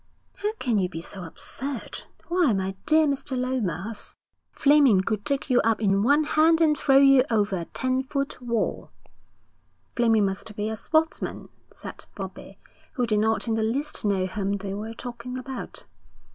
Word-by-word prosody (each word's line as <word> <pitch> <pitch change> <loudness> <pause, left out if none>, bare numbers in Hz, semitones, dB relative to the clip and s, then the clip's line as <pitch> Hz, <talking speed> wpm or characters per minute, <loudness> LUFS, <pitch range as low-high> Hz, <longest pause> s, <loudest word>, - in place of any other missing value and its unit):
'How 415 +1 -1
can 245 - 0
you 180 -2 0
be 165 - -6
so 180 +2 -7
absurd? 260 +10 -5 0.2
Why, 345 -8 +3
my 190 0 -1
dear 310 +1 +5
Mr. 275 -2 -2
Lomas, 225 -5 -3 0.4
Fleming 280 -9 +5
could 210 +1 -2
take 275 +5 0
you 250 -2 +4
up 225 -2 +1
in 195 -2 +2
one 285 +7 +4
hand 320 +2 +3
and 310 -2 +4
throw 270 -2 +3
you 275 -2 +7
over 210 -3 +1
a 170 - -4
ten 255 +6 -1
foot 275 0 -4
wall.' 235 -2 -2 1.1
'Fleming 225 -3 +3
must 195 +2 -4
be 210 +1 -2
a 220 - -3
sportsman,' 315 +8 -1 0.2
said - - -9
Bobbie, - - -8 0.4
who 250 -3 0
did 215 -2 +1
not 220 +2 +1
in 225 - +1
the 220 - 0
least 265 +7 -1
know 195 -3 +1
whom 195 +1 -2
they 200 -1 -4
were 220 +3 -6
talking 245 +1 -7
about. 255 0 -6
235 Hz, 170 wpm, -25 LUFS, 205-275 Hz, 1.1 s, you